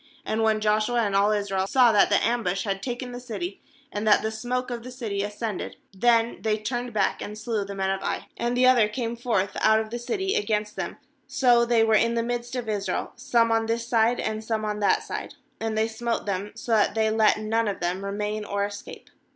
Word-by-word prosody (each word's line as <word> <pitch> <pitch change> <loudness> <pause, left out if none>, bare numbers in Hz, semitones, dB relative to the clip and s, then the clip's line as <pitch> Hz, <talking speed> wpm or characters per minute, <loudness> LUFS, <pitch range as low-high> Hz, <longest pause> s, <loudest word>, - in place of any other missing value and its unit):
21And 220 +1 -1
when 220 -1 +3
Josh 215 0 +2
ua 240 0 +1
and 200 -3 0
all 200 +1 +4
Israel 200 -2 0
saw 245 +1 +5
that 210 - +4
the 205 - +4
am 240 +1 +1
bush 195 -1 -1
had 195 -3 -2
taken 245 +1 -4
the 245 - -6
city, 205 -7 -6 0.3
and 210 +1 -3
that 210 - +5
the 220 - -1
smoke 245 +3 -3
of 235 -1 -4
the 250 - -9
city 225 -6 -3
ascended, 210 0 -4 0.2
then 230 +3 +2
they 215 -1 +1
turned 240 +3 -3
back, 205 -3 0
and 210 +1 -6
slew 215 -1 -2
the 200 0 -7
men 190 0 0
of 195 - -2
Ai. - - -3
^And 240 +1 -1
the 250 +1 +4
other 250 -4 +6
came 230 +1 -3
forth 225 -5 -1
out 220 0 +5
of 220 0 -4
the 240 - -3
city 385 - -2
against 210 0 -1
them; - - -4 0.3
so 240 -2 +4
they 235 -1 +3
were 220 0 +3
in 230 +2 +3
the 230 - +1
midst 240 +1 -3
of 245 -2 -3
Israel, 205 -2 -2
some 240 -2 +2
on 225 0 +2
this 230 +1 -1
side, 235 0 +2
and 220 0 -2
some 220 -1 -2
on 210 0 -2
that 205 - +2
side; - - -6 0.2
and 220 -1 -2
they 220 +1 +2
smote 230 +1 -3
them, 200 0 -3
so 230 +1 -6
that 215 -1 +3
they 220 -1 +2
let 220 -1 +4
none 220 +1 0
of 200 - -2
them 180 +2 -2
remain 210 +2 -3
or 200 -1 -1
escape. 205 0 -9
220 Hz, 235 wpm, -25 LUFS, 205-235 Hz, 0.3 s, other